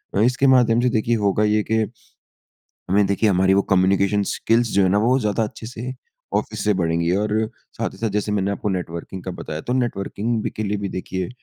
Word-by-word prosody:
अ, -, -, +2 dB
इसके 125 Hz, +4 st, +3 dB
माध्यम 120 Hz, -3 st, +4 dB
से 125 Hz, -, +3 dB
देखिए 115 Hz, 0 st, +1 dB
होगा 105 Hz, 0 st, +1 dB
ये 105 Hz, 0 st, +2 dB
के -, -, +4 dB, 1.1 s
हमें 100 Hz, +2 st, +4 dB
देखिए 100 Hz, +2 st, +2 dB
हमारी 95 Hz, 0 st, +3 dB
वो 100 Hz, -, +4 dB
कम्यूनिकेशन 100 Hz, +2 st, +3 dB
स्किल्स 115 Hz, 0 st, +1 dB
जो 100 Hz, -, +4 dB
है 95 Hz, -, +3 dB
ना 100 Hz, -, +3 dB
वो 120 Hz, +5 st, +3 dB
ज़्यादा 110 Hz, -1 st, 0 dB
अच्छे 110 Hz, +1 st, -7 dB
से 125 Hz, +2 st, -6 dB, 0.4 s
ऑफिस -, -, -3 dB
से 105 Hz, -, +3 dB
बढ़ेंगी। 85 Hz, -2 st, 0 dB
और 105 Hz, +1 st, 0 dB, 0.4 s
साथ -, -, -1 dB
ही -, -, -13 dB
साथ 115 Hz, -, 0 dB
जैसे 105 Hz, +1 st, -1 dB
मैंने 100 Hz, -1 st, 0 dB
आपको 100 Hz, +1 st, -2 dB
नेटवर्किंग 90 Hz, 0 st, -5 dB
का 95 Hz, -, -4 dB
बताया 75 Hz, 0 st, -5 dB
तो -, -, +2 dB
नेटवर्किंग 115 Hz, -2 st, -1 dB
भी -, -, -1 dB
के 110 Hz, -, -1 dB
लिए 105 Hz, 0 st, -1 dB
भी 100 Hz, -1 st, -3 dB
देखिए 95 Hz, -1 st, -4 dB
105 Hz, 215 wpm, -22 LUFS, 95-115 Hz, 1.1 s, माध्यम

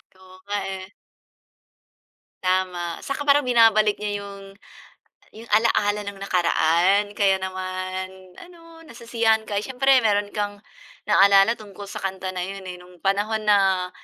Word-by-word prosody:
Oo 185 Hz, 0 st, -17 dB
nga, 205 Hz, 0 st, -2 dB, 0.2 s
eh. 190 Hz, 0 st, -8 dB, 1.5 s
Tama 185 Hz, -2 st, -1 dB
'saka 290 Hz, +1 st, -4 dB
parang 285 Hz, 0 st, +5 dB
binabalik 225 Hz, -4 st, +4 dB
niya 205 Hz, -1 st, -3 dB
'yong 195 Hz, -1 st, -11 dB, 0.8 s
'yong 225 Hz, +1 st, -13 dB
alaala 210 Hz, -2 st, +2 dB
ng 200 Hz, -1 st, -8 dB
nakaraan. 180 Hz, +1 st, +2 dB
Kaya 195 Hz, -2 st, +2 dB
naman 185 Hz, 0 st, -6 dB
ano 330 Hz, -2 st, -15 dB
nasisiyahan 230 Hz, -2 st, -1 dB
ka, 205 Hz, -, -5 dB
eh, -, -, -2 dB
siyempre 265 Hz, 0 st, +2 dB
mayro'n 205 Hz, -1 st, 0 dB
kang 205 Hz, -1 st, -3 dB, 0.5 s
naalala 200 Hz, +3 st, +5 dB
tungkol 205 Hz, -2 st, -11 dB
sa -, -, -8 dB
kanta 190 Hz, -1 st, -4 dB
na 180 Hz, -, -3 dB
yun, 195 Hz, +1 st, -6 dB
eh, 180 Hz, -, -6 dB
nung 180 Hz, 0 st, -17 dB
panahon 210 Hz, +3 st, -1 dB
na, 190 Hz, -3 st, +2 dB
200 Hz, 135 wpm, -23 LUFS, 185-220 Hz, 1.5 s, parang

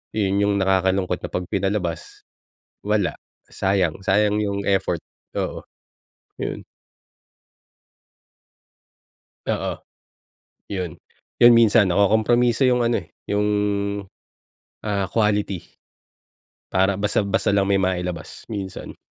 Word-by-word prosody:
Yun 100 Hz, -2 st, +1 dB
yung 100 Hz, 0 st, +2 dB
nakakalungkot 95 Hz, -1 st, +1 dB
na -, -, -5 dB
‘pag 90 Hz, -, -3 dB
pinalabas, 95 Hz, -3 st, -3 dB, 0.6 s
wala. 105 Hz, -5 st, 0 dB, 0.3 s
Sayang 95 Hz, -5 st, 0 dB
sayang 105 Hz, +2 st, +3 dB
yung 100 Hz, -1 st, -1 dB
effort. 95 Hz, -1 st, +1 dB, 0.3 s
Oo, -, -, -3 dB, 0.8 s
yun. -, -, -4 dB, 2.8 s
Oo. -, -, -2 dB, 0.9 s
Yun, 90 Hz, -5 st, -3 dB, 0.5 s
yun 120 Hz, 0 st, +10 dB
minsan 110 Hz, -3 st, +5 dB
nakokompromiso 110 Hz, +6 st, +3 dB
yung 125 Hz, -1 st, +2 dB
ano, 115 Hz, 0 st, +1 dB
eh, -, -, -18 dB, 0.2 s
yung, 105 Hz, 0 st, 0 dB, 1.4 s
ah, 100 Hz, -2 st, -1 dB
quality. 105 Hz, -3 st, 0 dB, 1.1 s
Para 95 Hz, +1 st, +3 dB
basta 105 Hz, +1 st, +1 dB
basta 100 Hz, +1 st, 0 dB
lang 100 Hz, -1 st, +2 dB
may 100 Hz, -, +4 dB
mailabas, 90 Hz, -2 st, -3 dB
minsan. 100 Hz, -3 st, -6 dB
100 Hz, 95 wpm, -22 LUFS, 95-105 Hz, 2.8 s, yun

